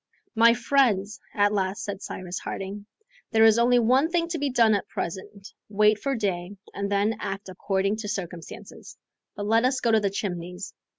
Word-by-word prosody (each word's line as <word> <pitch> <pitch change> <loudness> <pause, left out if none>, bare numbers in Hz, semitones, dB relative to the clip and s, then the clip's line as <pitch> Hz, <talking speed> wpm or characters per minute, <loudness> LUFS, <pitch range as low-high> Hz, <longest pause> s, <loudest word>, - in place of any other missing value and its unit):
"My 230 0 +5
friends," 230 -5 +1 0.2
at 205 0 +3
last 195 +2 -1
said 200 -2 -5
Cyrus 180 -1 -6
Harding, 200 +2 -6 0.4
"there 220 -1 +4
is 225 +1 +5
only 245 +1 +4
one 255 +6 +3
thing 340 -1 0
to 335 -2 -3
be 285 0 0
done 230 -4 +4
at 200 - -1
present; 195 +3 -6 0.2
wait 210 +1 +3
for 275 -1 -1
day, 195 -3 -3 0.2
and 200 0 -3
then 205 +3 +1
act 195 0 -5
according 195 +2 -1
to 220 -1 -5
circumstances. 175 -5 -7 0.4
But 205 - -4
let 225 +2 +3
us 255 +1 +1
go 235 - +1
to 220 - +5
the 205 -1 0
Chimneys. 180 -1 -5
205 Hz, 180 wpm, -25 LUFS, 195-230 Hz, 0.4 s, My